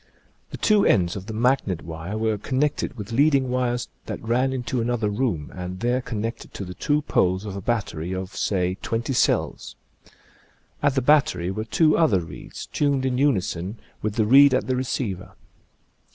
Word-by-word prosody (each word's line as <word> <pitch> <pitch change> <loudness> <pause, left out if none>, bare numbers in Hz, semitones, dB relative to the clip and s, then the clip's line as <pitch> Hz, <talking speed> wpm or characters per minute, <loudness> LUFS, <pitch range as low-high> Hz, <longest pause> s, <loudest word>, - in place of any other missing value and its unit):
The - - -7
two 210 -2 +3
ends 85 -3 +3
of 95 0 -7
the 110 - -5
magnet 115 -7 +1
wire 80 +5 -5
were 110 -1 0
connected 135 +3 -1
with 105 +1 -7
lead 140 +5 +4
ing 130 -2 +1
wires 125 -1 0 0.2
that - - -4
ran 125 +4 +1
into 125 -1 -2
another 115 -3 0
room 100 - -2
and 90 0 -6
there 120 +2 +1
connected 115 -1 -5
to 100 - -5
the 90 - -7
two 150 - 0
poles 95 -5 +1
of 100 -2 -5
a 100 - -5
battery 95 -7 -2
of, 95 0 -5
say, 90 -1 0
twenty 115 +4 -2
cells. - - 0 1.1
At 140 - +2
the 135 - +1
battery 130 - +3
were 110 +3 -4
two 155 +8 +3
other 110 - +3
reeds, 80 - -9
tuned 140 -3 0
in 125 -1 0
unison 100 -7 0 0.2
with 105 -1 -2
the 110 - +2
reed 135 +3 +7
at - - 0
the 130 - 0
receiver. 125 -7 -3
115 Hz, 180 wpm, -24 LUFS, 95-130 Hz, 1.1 s, reed